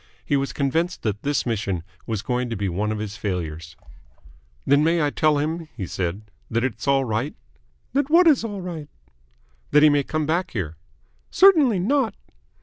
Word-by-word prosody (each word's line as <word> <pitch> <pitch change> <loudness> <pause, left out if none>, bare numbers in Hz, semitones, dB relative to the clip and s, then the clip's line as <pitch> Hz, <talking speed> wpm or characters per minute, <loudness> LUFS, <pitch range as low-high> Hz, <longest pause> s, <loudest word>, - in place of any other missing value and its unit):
He 145 - +1
was 135 0 0
convinced 165 +6 -1
that 105 -2 -2
this 145 0 0
mission 100 -7 -2 0.2
was 110 -2 -2
going 125 +1 -1
to 115 - -3
be 100 0 -2
one 100 +4 -1
of 110 - -2
his 105 -1 -5
failures. 80 -5 -4 0.9
"Then 140 +1 +4
I - - +3
may 160 -2 +2
tell 155 -1 +2
him," 160 +2 -2
he 100 - -3
said, 90 +3 -3 0.3
"that 115 +1 0
it's 120 -2 -3
all 135 -1 +3
right?" 115 +6 -2 0.6
"That 285 +1 +1
what 345 +3 +6
is 295 -8 +5
all 205 -4 -4
right?" 165 -5 -6 0.8
"That 150 - +5
he 155 - +8
may 145 -1 +3
come 155 +2 -2
back 170 +4 -1
here?" 85 -8 -3 0.5
"Certainly 300 - +5
not." 235 0 +1
140 Hz, 180 wpm, -23 LUFS, 105-170 Hz, 0.9 s, he